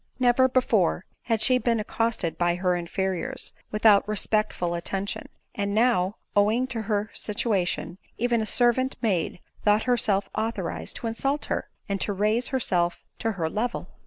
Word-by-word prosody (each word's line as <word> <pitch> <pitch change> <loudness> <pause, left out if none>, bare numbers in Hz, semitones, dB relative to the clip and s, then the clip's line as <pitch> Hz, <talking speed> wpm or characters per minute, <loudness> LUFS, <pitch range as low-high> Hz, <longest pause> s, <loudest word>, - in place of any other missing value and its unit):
Never 255 +1 +4
before 220 -8 +2 0.2
had 225 -3 0
she 255 -1 +4
been 235 -2 +1
accosted 220 -5 -1
by 175 0 +1
her 180 0 +1
inferiors 180 +1 -2 0.2
without 210 -1 +4
respectful 215 -4 0
attention; 190 +3 -3 0.2
and 200 0 -2
now, 215 -4 +2 0.2
owing 215 +5 +3
to 235 -3 -3
her 210 0 -1
situation, 195 -4 -1 0.2
even 235 -1 +1
a 215 - -1
servant 250 +3 +3
maid 180 -5 0 0.2
thought 210 +1 +3
herself 220 -5 +2
authorized 220 -6 -3
to - - -6
insult 275 +6 -1
her, - - -3 0.2
and 200 -1 -2
to 205 - 0
raise 215 +5 +1
her 265 - 0
self 175 -6 0 0.2
to 225 -1 -1
her 170 -4 -2
level 230 +8 -3
215 Hz, 155 wpm, -26 LUFS, 190-235 Hz, 0.2 s, Never